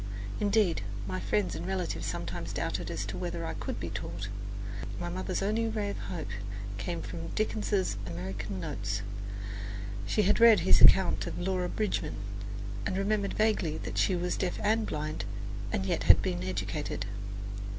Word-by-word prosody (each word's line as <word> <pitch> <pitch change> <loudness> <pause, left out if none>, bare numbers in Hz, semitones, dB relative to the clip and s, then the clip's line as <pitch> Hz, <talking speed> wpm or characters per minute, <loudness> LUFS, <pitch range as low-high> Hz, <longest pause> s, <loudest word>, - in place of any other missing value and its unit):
Indeed, 205 - +3 0.3
my 95 -1 -2
friends 100 -1 +1
and - - -4
relatives 190 -2 -1
sometimes - - -3
doubted - - -1 0.2
whether - - -3
I - - -2
could - - -4
be - - -3
taught. 95 +4 -4 0.7
My 175 - -2
mother's 185 +1 -1
only 220 +3 +2
ray 210 -2 -1
of - - -5
hope 170 -4 -4 0.5
came 85 -4 -2
from 85 0 -5
Dickens's 210 - +1
"American 95 +3 -4
Notes." 95 +3 -2 1.0
She 210 - +3
had 205 +4 +4
read 230 -5 +8
his 180 - +6
account 190 -1 +7
of - - -4
Laura 180 0 0
Bridgman, 195 -8 -1 0.7
and 185 - -1
remembered 200 0 +1
vaguely 215 -8 +2
that - - -3
she 190 - +4
was 180 0 0
deaf 180 -2 0
and 220 +1 +3
blind, 155 -5 -2 0.5
yet 95 -1 0
had - - +8
been 90 0 -1
educated. 95 +5 -2
175 Hz, 150 wpm, -31 LUFS, -, 1.0 s, read